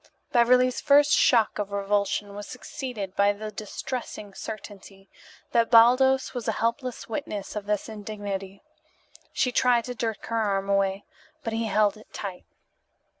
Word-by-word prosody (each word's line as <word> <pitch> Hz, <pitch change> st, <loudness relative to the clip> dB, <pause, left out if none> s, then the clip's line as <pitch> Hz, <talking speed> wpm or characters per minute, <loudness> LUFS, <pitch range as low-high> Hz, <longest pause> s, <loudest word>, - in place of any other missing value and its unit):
Beverly's 250 Hz, 0 st, +4 dB
first 290 Hz, 0 st, +5 dB
shock 230 Hz, -4 st, +4 dB
of 205 Hz, -1 st, -3 dB
revulsion 200 Hz, 0 st, -1 dB
was 205 Hz, 0 st, -7 dB
succeeded 245 Hz, -7 st, -6 dB
by 200 Hz, 0 st, +4 dB
the 215 Hz, +1 st, -7 dB
distressing 210 Hz, 0 st, -6 dB
certainty 195 Hz, -2 st, -9 dB, 0.4 s
that 230 Hz, -1 st, +3 dB
Baldos 255 Hz, +3 st, +5 dB
was 245 Hz, -3 st, -5 dB
a 225 Hz, -, +1 dB
helpless 235 Hz, +3 st, -2 dB
witness 220 Hz, -6 st, -5 dB
of 205 Hz, -1 st, -5 dB
this 210 Hz, -1 st, -1 dB
indignity. 205 Hz, -3 st, -6 dB, 0.7 s
She 250 Hz, -, +1 dB
tried 245 Hz, -1 st, +3 dB
to 250 Hz, -, -4 dB
jerk 225 Hz, -2 st, -3 dB
her 230 Hz, 0 st, -1 dB
arm 195 Hz, -2 st, 0 dB
away, 195 Hz, 0 st, +1 dB, 0.4 s
but 225 Hz, -, -3 dB
he 225 Hz, 0 st, -1 dB
held 210 Hz, 0 st, +2 dB
it 215 Hz, -, -17 dB
tight. 190 Hz, -3 st, -6 dB
215 Hz, 145 wpm, -26 LUFS, 200-245 Hz, 0.7 s, first